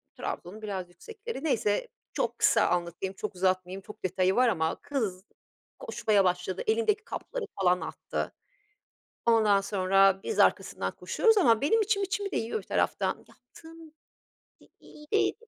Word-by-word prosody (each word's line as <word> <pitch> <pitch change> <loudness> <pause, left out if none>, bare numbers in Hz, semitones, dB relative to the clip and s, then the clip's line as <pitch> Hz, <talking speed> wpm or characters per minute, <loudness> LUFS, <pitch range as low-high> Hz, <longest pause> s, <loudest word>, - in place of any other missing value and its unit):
Trabzon'un 200 +5 -6
biraz 190 -4 -4
yüksekleri, 445 - -8
neyse, 250 - +1 0.3
çok - - -2
kısa - - +4
anlatayım, 175 +2 -2
çok 210 0 -5
uzatmayayım, 185 +1 0
çok 210 +1 -13
detayı 185 +1 +1
var 250 0 +4
ama 160 -6 0
kız 220 -11 -3 0.6
koşmaya 220 - +1
başladı, 180 +1 -1
elindeki 440 -1 +1
kapları, - - -5 0.2
falan, 180 -1 +3
attı. - - -4 0.9
Ondan 215 -4 +4
sonra 195 -1 +3
biz 445 - -3
arkasından - - +2
koşuyoruz 450 -1 +2
ama 235 - +4
benim 440 +11 +3
içim 410 -1 +1
içimi 395 +1 -2
de - - -1
yiyor 225 - -2
bir - - -14
taraftan - - 0
yaptığım, 325 -1 -15 0.7
i - - -20
iyi 300 0 -15
değil, 420 - +3
215 Hz, 145 wpm, -28 LUFS, -, 0.9 s, kısa